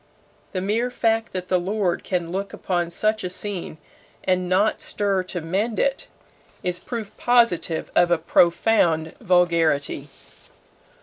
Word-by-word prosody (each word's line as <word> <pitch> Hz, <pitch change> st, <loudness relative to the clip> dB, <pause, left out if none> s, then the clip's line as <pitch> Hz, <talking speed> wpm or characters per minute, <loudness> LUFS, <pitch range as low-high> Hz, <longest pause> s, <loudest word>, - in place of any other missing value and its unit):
The 185 Hz, -, -1 dB
mere 220 Hz, +6 st, 0 dB
fact 225 Hz, -2 st, 0 dB
that 180 Hz, -1 st, -4 dB
the 185 Hz, -1 st, +2 dB
lord 190 Hz, 0 st, -1 dB
can 175 Hz, -3 st, -2 dB
look 195 Hz, +2 st, -3 dB
upon 175 Hz, -2 st, -1 dB
such 215 Hz, +5 st, 0 dB
a 180 Hz, -, -2 dB
scene 185 Hz, -3 st, -5 dB, 0.5 s
and 185 Hz, -1 st, 0 dB
not 200 Hz, +4 st, +2 dB
stir 200 Hz, -2 st, 0 dB
to 180 Hz, -1 st, -4 dB
mend 200 Hz, +8 st, -1 dB
it, 275 Hz, -1 st, 0 dB, 0.6 s
is 180 Hz, 0 st, -2 dB
proof 220 Hz, -4 st, -6 dB
positive 235 Hz, -9 st, +2 dB
of 175 Hz, 0 st, +5 dB
a 175 Hz, -, +3 dB
profound 170 Hz, -1 st, +2 dB
vulgarity. 165 Hz, -5 st, +2 dB
185 Hz, 135 wpm, -23 LUFS, 175-215 Hz, 0.6 s, of